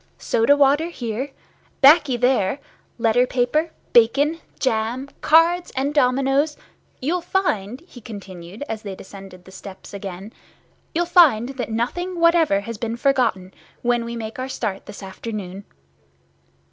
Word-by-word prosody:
Soda 235 +6 +2
water 290 +3 +3
here—baccy 270 +2 +1
there—letter 245 0 0
paper, 255 +7 0 0.2
bacon, 280 +8 +4 0.2
jam, 240 +2 -1
cards 340 +3 +4
and 275 +3 -1
dominoes—you'll 275 +4 -1
find," 255 - -1
he 340 -8 -15
continued, 195 -1 -9
as 220 -3 -5
they 200 -3 -6
descended 190 -2 -12
the 190 - -14
steps 190 +1 -11
again, 195 +1 -7 0.6
"you'll 345 +1 +2
find 310 - +5
that 265 -3 -5
nothing 345 +11 -3
what 335 0 +5
ever 315 -13 +2
has 230 +1 -7
been 230 0 -3
forgotten, 235 -9 0 0.3
when 240 -1 +1
we 235 0 -6
make 225 +1 -6
our 260 +1 -4
start 210 -7 -4
this 205 -1 -10
afternoon." 195 -1 -7
245 Hz, 125 wpm, -22 LUFS, 210-285 Hz, 0.6 s, find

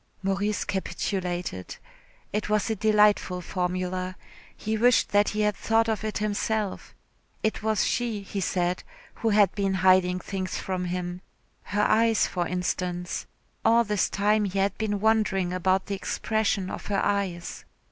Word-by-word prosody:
Maurice 200 +2 0
capitulated. 180 - -3 0.6
It 210 0 -1
was 215 +1 +1
a - - 0
delightful 210 -3 +3
formula. 185 +1 -2 0.4
He 220 +1 -2
wished 240 +2 +4
that 205 0 +3
he 215 - -1
had 210 -1 +2
thought 225 0 +2
of 220 -1 -1
it 215 -1 -2
himself. 210 0 -2 0.5
It 220 - 0
was 215 -1 +1
she, 230 -4 -1
he 195 0 -4
said, 180 0 0 0.3
who 225 - -1
had 205 -3 +4
been 195 -2 0
hiding 185 -1 +4
things 190 0 -4
from 185 -1 -3
him. 180 0 -3 0.4
Her 205 0 0
eyes, 225 +1 +4
for 175 -2 -2
instance. 180 0 -2 0.4
All 230 +1 +5
this 210 -3 0
time 210 +1 +2
he 195 0 -3
had 195 0 +1
been 205 -2 -1
wondering 210 -5 +2
about 185 +1 +1
the 200 - -4
expression 200 -1 -1
of - - -6
her 200 -1 0
eyes. 190 -4 -2
200 Hz, 150 wpm, -26 LUFS, 185-215 Hz, 0.6 s, All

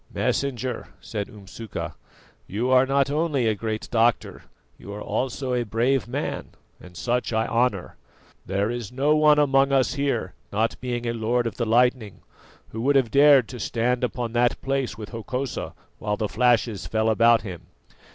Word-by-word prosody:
"Messenger," 130 -3 -2
said 105 -2 -5
Umsuka, 105 -2 -7 0.5
"you 120 +6 -1
are 130 0 +5
not 140 0 +2
only 150 -4 0
a 110 - +3
great 110 +1 -4
doctor, 115 0 +1 0.3
you 100 - -11
are 105 - -6
also 130 +2 -2
a 125 - +1
brave 120 +5 0
man, 135 +4 -3 0.3
and 90 -1 -13
such 125 +4 -1
I 110 0 +1
honour. 115 -6 0 0.5
There 100 +4 -1
is 120 -4 -5
no 140 +4 +2
one 150 -1 +5
among 140 -1 +3
us 135 -1 +2
here, 140 -1 -1 0.2
not 110 +2 -1
being 120 -1 -3
a 115 - -1
lord 120 +2 0
of 110 -4 -4
the 120 - -1
lightning, 120 -2 +1 0.5
who 110 - -6
would 140 +4 +2
have 130 -4 +3
dared 140 -4 +6
to 125 - -8
stand 120 +3 -1
upon 120 -2 -2
that 120 0 +2
place 135 -5 -1
with 105 -2 -8
Hokosa 125 +3 -4 0.2
while 105 0 -2
the 110 - -1
flashes 115 -2 +1
fell 110 0 0
about 115 +1 +4
him. 90 -6 -8
120 Hz, 170 wpm, -24 LUFS, 110-130 Hz, 0.5 s, dared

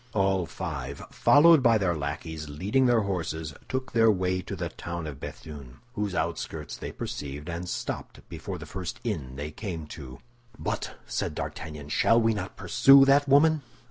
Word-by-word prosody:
All 95 -3 +2
five, 70 -6 -5
followed 160 +1 +6
by 115 -3 +5
their 95 -5 +1
lackeys 75 +1 -5
leading 100 - +1
their 120 -2 +4
horses, 80 -6 -3 0.2
took 130 0 -3
their 115 -1 +5
way 95 -2 +1
to - - -6
the - - -3
town 85 -1 -6
of 70 -3 -7
Béthune, 70 -5 -9 0.2
whose 105 -4 -2
outskirts - - -3
they - - -6
perceived, 75 +1 -6
and 85 +1 -4
stopped - - -5
before - - -6
the - - -9
first 95 -5 -6
inn 65 -3 -3
they 75 +2 -5
came 85 -3 -5
to. 65 -5 -9 0.4
"But," - - -4
said - - -3
D'Artagnan, 75 -2 -6
"shall 115 +9 +4
we 115 -1 +3
not 105 - -5
pursue 135 0 +6
that 140 +1 +4
woman?" 155 +2 +5
90 Hz, 170 wpm, -27 LUFS, 75-115 Hz, 0.4 s, followed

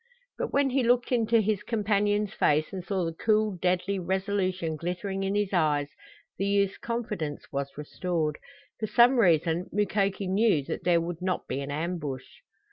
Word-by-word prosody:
But - - -2
when 280 -1 +2
he 270 +1 +2
looked 245 +1 +2
into 230 -2 +3
his 210 -1 0
companion's 210 -1 0
face 155 +5 +1
and 185 -2 -4
saw 190 -1 -1
the 165 - -3
cool 215 0 +1
deadly 185 +2 +1
resolution 185 -2 -1
glittering 180 +4 -3
in 195 +1 -1
his 205 -1 0
eyes, 150 -4 +2 0.5
the 195 - +1
youth's 200 -1 +1
confidence 210 -11 -4
was 140 0 -4
restored. 155 0 -2 0.4
For 215 - -2
some 240 +4 +5
reason 170 -2 +3
Mukoki 200 -1 0
knew 190 -5 +2
that - - -5
there 175 -1 +4
would 170 0 -5
not 185 0 -2
be 135 - -3
an 140 - -5
ambush. 150 -3 -3
190 Hz, 165 wpm, -28 LUFS, 165-210 Hz, 0.5 s, some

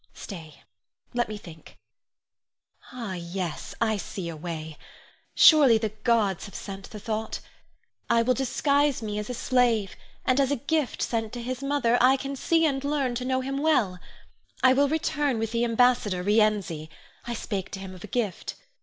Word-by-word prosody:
Stay! 160 -7 -9 0.5
let 240 -1 0
me 215 - -5
think. 165 -5 -13 1.1
Ah, 230 -6 -5
yes; 170 -4 -5
I 220 -2 +1
see 185 -3 -5
a 165 - -6
way. 155 -1 -6 0.6
Surely 285 -8 +8
the 220 -1 -1
gods 215 -3 0
have 200 - -13
sent 195 -1 -7
the 215 - -8
thought! 220 +1 -3 0.7
I 230 0 +4
will 255 +2 +3
disguise 280 +1 +1
me 210 -1 -3
as 210 - -5
a 250 - -3
slave, 235 -5 +1 0.3
and 255 +1 +3
as 270 -2 +3
a 285 - +2
gift 285 +1 -1
sent 225 -2 -2
to 245 - -5
his 255 +1 -4
mother, 275 -4 +2
I 260 +2 +6
can 275 +1 -5
see 325 +4 +2
and 275 -3 0
learn 280 -3 0
to 250 +1 -3
know 260 0 +1
him 270 +1 -3
well. 245 -12 +2 0.6
I 255 0 +7
will 280 +1 +3
return 295 -4 0
with 225 0 -2
the 235 0 +1
ambassador, 230 -6 +2
Rienzi. 205 -7 +1 0.4
I 240 0 -3
spake 200 -4 -4
to 195 - -4
him 190 -1 -8
of 185 - -12
a - - -7
gift. 215 -8 -2
230 Hz, 175 wpm, -26 LUFS, 195-265 Hz, 1.1 s, Surely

